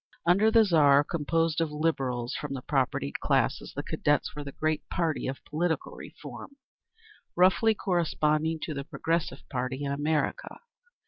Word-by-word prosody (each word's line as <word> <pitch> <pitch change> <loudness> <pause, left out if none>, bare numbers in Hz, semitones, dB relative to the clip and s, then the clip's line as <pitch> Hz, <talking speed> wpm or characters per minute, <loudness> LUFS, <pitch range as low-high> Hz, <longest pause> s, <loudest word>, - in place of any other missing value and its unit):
Under 195 +6 +5
the 225 0 +6
Tsar 145 -6 +5
composed 165 +1 0
of 165 - 0
Liberals 135 -6 -1
from 145 -2 -4
the 130 - -6
propertied 130 - -1
classes, - - 0
the - - -3
Cadets 145 0 0
were 150 - -5
the 140 - -7
great 155 +1 -1
party 165 -3 -1
of 135 +1 -6
political 160 +2 -1
reform, 280 - -10 0.8
roughly 190 +5 +4
corresponding 160 -4 0
to 155 - -3
the 140 -1 -4
Progressive 160 -2 -2
Party 130 +2 -3
in 140 - -2
America. 150 +2 -1
155 Hz, 145 wpm, -28 LUFS, 140-170 Hz, 0.8 s, the